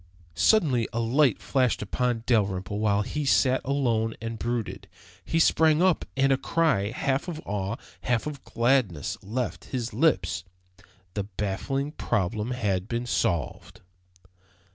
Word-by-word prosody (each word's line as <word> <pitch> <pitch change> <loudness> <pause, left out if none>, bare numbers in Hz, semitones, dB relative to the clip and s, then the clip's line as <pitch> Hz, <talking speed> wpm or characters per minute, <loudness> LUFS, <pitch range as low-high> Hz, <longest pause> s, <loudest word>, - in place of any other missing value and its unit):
Suddenly 125 - +3
a 115 - -2
light 125 +2 +2
flashed 125 -5 +1
upon 120 +2 -1
Dalrymple 100 -3 0
while 105 -1 +2
he 150 +8 -3
sat 130 -1 +3
alone 120 -5 0
and 115 0 -5
brooded. 120 -2 -3 0.4
He 165 - -1
sprang 160 -1 +4
up 185 -4 +2
and 135 0 +3
a 135 - +4
cry, 155 -12 +1
half 135 +5 -1
of 165 -3 -4
awe, 100 +1 -2 0.3
half 120 -3 0
of 145 -3 -6
gladness, 115 - 0
left 115 +4 -3
his 125 -2 -4
lips. 95 - +1 0.7
The 100 -2 -2
baffling 105 +8 -3
problem 105 - -1
had 100 -7 -1
been 120 +1 -2
solved! 85 - -2
120 Hz, 135 wpm, -26 LUFS, 105-135 Hz, 0.7 s, sprang